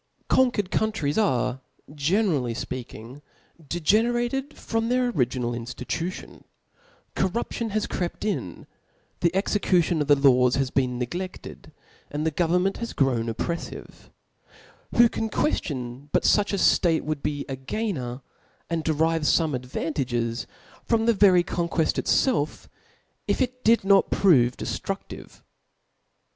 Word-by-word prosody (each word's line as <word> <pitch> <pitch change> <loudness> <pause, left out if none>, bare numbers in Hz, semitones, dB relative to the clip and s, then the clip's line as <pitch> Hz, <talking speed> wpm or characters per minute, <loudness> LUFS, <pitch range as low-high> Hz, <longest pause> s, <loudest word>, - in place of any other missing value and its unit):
' - - -40
Conquered 235 -7 +2
countries 215 -10 0
are, 130 - 0 0.3
generally 150 - +1
fpeaking, 125 +2 -7 0.4
de 165 +4 -4
generated 240 - +1
frohl 225 -5 -3
their 250 0 +2
original 125 - -1
iriftitatiohi 125 +9 -5 0.4
' 485 +1 -34
Corrop 190 +5 -1
tion 230 -1 -3
has 215 0 -1
crept 175 +3 -4
in, 180 - -3 0.5
the 170 - +3
execution 180 -5 +1
of 145 - -1
the 145 - +6
laws 125 -3 +4
has 135 -1 0
been 125 -2 0
hegleAed, 175 +10 -6 0.4
and 150 +2 -3
the 160 - +1
govern 175 +3 +1
taejat 195 +4 -1
is 235 - -4
grown 120 -4 +1
op 115 - -5
j)rcffive/ 170 -1 -6 0.9
Who 240 0 +7
can 225 -1 -3
quicftioii 135 - -2
but - - +2
fuch 205 -1 +3
a 200 - 0 0.2
tete 165 -3 +1
wouH 155 -2 -3
be 145 -1 -3
a 135 - -4
gainer, 130 - -4 0.5
sthd 165 -1 -1
derive 160 +1 +1
Ibme 155 0 +2
advantages 125 -2 -2 0.4
from 225 -1 +1
the 235 - +4
very 190 -4 +5
conqueft 170 -2 0
itfclf, 235 - 0 0.6
if - - 0
it 255 -1 -2
did 230 +1 +5
hot 195 0 +4
prove 130 -11 +4
deftrudivc? - - -6
165 Hz, 135 wpm, -25 LUFS, 130-210 Hz, 0.9 s, Who